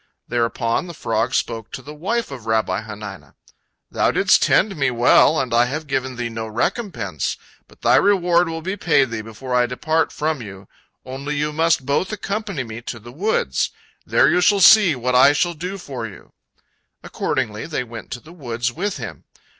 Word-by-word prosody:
Thereupon 115 +4 -1
the 170 - -8
frog 115 +1 -1
spoke 115 -1 -2
to 130 - -6
the 150 - -9
wife 195 +7 -2
of 125 -5 -9
Rabbi 110 -4 +1
Hanina: 105 -3 -9 0.6
"Thou - - +2
didst - - +4
tend 200 -1 +3
me 140 -3 +1
well, 125 +6 +4
and 130 -3 -2
I 120 +1 +5
have 150 +5 -4
given 130 -2 -2
thee 120 -1 -3
no 115 -1 -5
recompense. 115 - -2 0.3
But - - -22
thy - - +5
reward 180 -4 +3
will 165 0 -5
be 190 +3 -2
paid 140 - +2
thee 110 -1 -3
before 115 +4 -7
I 125 -1 +3
depart 155 +6 0
from 155 -3 -2
you, 95 -3 -10 0.4
only 135 +3 -5
you 150 +1 -1
must 160 -3 +2
both 145 +8 0
accompany 205 -8 -3
me 115 0 -8
to 120 - -6
the 120 +2 -12
woods. 195 - 0 0.3
There - - +3
you 180 - +3
shall 200 +2 +4
see 195 -4 +7
what 125 0 -2
I 130 +3 +7
shall 175 +4 +1
do 180 +5 -5
for 130 -10 -6
you." 95 - -14 0.7
Accordingly, 105 +4 -2
they 150 -5 -2
went 115 -1 -10
to 125 - -6
the 160 +6 -15
woods 120 -6 -3
with 195 +9 -3
him. - - -8
130 Hz, 185 wpm, -21 LUFS, 115-165 Hz, 0.7 s, see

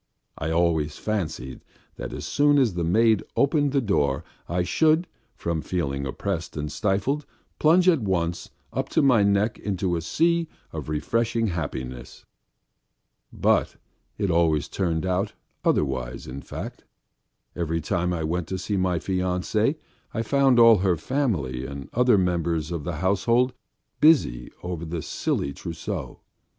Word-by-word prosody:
I 80 - -3
always 80 -3 +1
fancied 80 - -3 0.3
that - - -5
as - - -6
soon 145 0 +3
as 125 -8 +3
the 85 -1 -2
maid 110 +5 +4
opened 145 0 +2
the 140 0 +2
door 75 - +1 0.3
I 90 +1 +1
should, 160 - +3 0.3
from 85 -2 -2
feeling 70 -7 -2
oppressed 80 +5 -4
and 75 0 -3
stifled, 105 - 0 0.3
plunge 175 +4 +5
at 165 -7 +5
once 85 -4 -1 0.2
up - - -2
to - - +2
my 125 -6 +5
neck 100 +2 +2
into 95 -3 -1
a 85 - -2
sea 165 - +1 0.2
of - - -5
refreshing 115 +8 0
happiness. 65 -7 -5 1.1
But - - +1 0.4
it 100 -4 0
always 80 -4 +2
turned 85 -3 -1
out 95 +3 0 0.3
otherwise 65 -4 0
in 65 +2 -7
fact. - - -7 0.7
Every 85 -1 -1
time 90 +2 -1
I 85 -2 -2
went 85 +1 -1
to 95 - -3
see 95 +2 -2
my 90 -2 +1
fiancée 95 - 0 0.4
I 115 - 0
found 135 +1 +3
all 115 -2 +8
her 90 -2 +2
family 75 - -1
and 70 -1 -7
other 125 -2 +4
members 85 -3 0
of 80 -4 -4
the 85 - -3
household 115 +6 +2 0.5
busy 120 - +4
over 90 -2 -4
the 80 -1 -4
silly 70 - -2
trousseau. 80 - -6
90 Hz, 145 wpm, -25 LUFS, 80-115 Hz, 1.1 s, all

